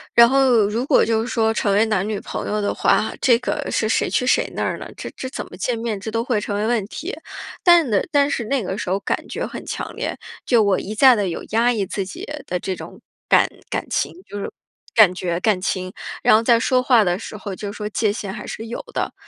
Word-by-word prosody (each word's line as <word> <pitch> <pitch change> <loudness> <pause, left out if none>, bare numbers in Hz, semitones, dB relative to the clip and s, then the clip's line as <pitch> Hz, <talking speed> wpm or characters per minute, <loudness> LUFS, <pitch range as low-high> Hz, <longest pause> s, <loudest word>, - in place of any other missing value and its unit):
然 235 0 +9
后 255 -5 +4
如 225 +4 -1
果 270 - +4
就 225 0 +1
是 230 - -4
说 225 -2 +1
成 205 - 0
为 210 +3 +4
男 210 -3 0
女 215 -2 -2
朋 - - -5
友 210 - -1
的 205 - 0
话， - - +2
这 240 -3 +5
个 250 - -3
是 220 - 0
谁 220 - +1
去 250 - 0
谁 - - +2
那 - - -1
儿 - - -2
呢？ - - -7
这 - - -7
这 260 - -5
怎 - - -5
么 - - -11
见 245 -2 -1
面， 225 -3 -3
这 195 - -6
都 230 +1 -1
会 235 -4 0
成 205 0 -3
为 210 - 0
问 230 -2 +1
题。 335 - -6 0.5
但 345 -5 +6
呢 200 - +3
但 285 -2 +3
是 235 - -1
那 260 +1 0
个 190 +2 -4
时 - - -4
候 190 +2 +1
感 195 - -3
觉 - - -3
很 - - -7
强 - - -5
烈， - - -3 0.3
就 235 -4 +3
我 200 -2 +2
一 215 - -6
再 260 +2 +7
地 205 -3 0
有 170 - -5
压 230 +3 +3
抑 215 -5 -1
自 195 +1 -3
己 185 - -8 0.2
的 180 - -2
这 190 +1 -3
种 - - -10 0.3
感 - - +5 0.2
感 - - -2
情， - - 0 0.2
就 205 - -6
是 - - -5 0.4
感 210 -5 +7
觉 175 -2 -2
感 195 -1 +1
情， 185 0 -2 0.3
然 - - +6
后 220 - +4
在 230 0 +4
说 255 +1 +2
话 250 -3 +4
的 180 -1 0
时 215 - -8
候 200 -1 -6
就 200 +1 -5
是 - - -10
说 210 - -4
界 210 0 +1
限 200 -2 -5
还 210 - -8
是 225 - -6
有 230 +1 -5
的。 - - -2
220 Hz, 275 characters per minute, -21 LUFS, 200-240 Hz, 0.5 s, 然